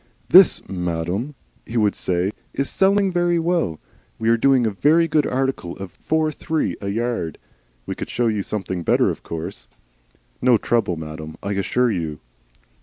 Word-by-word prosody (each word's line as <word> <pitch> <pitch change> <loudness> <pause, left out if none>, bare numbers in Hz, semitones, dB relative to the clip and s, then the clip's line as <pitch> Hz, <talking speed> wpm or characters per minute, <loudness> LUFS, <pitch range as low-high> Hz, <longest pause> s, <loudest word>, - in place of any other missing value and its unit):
"This, 185 -1 +7
madam," 90 - -3 0.3
he 120 - -5
would 105 -2 +3
say, 90 +2 -1 0.2
"is 140 0 -1
selling 195 0 +3
very 175 -1 +2
well." 165 - 0 0.4
"We 110 0 0
are 115 - +5
doing 130 +1 +3
a 110 - +1
very 155 - +3
good 150 -2 +2
article 130 -9 -2
at 95 -2 -7
four 155 0 0
three 155 - -2
a 100 - -4
yard." 110 -6 -2 0.5
"We - - -3
could - - -6
show 120 - 0
you 110 -3 +1
something 95 -3 -4
better, - - +3
of - - -8
course." 80 -7 -6 0.7
"No 125 -2 +5
trouble, 115 -6 0
madam, 80 0 -7
I 100 - -2
assure 115 +5 +1
you." 80 -6 -3
110 Hz, 165 wpm, -22 LUFS, 90-145 Hz, 0.7 s, This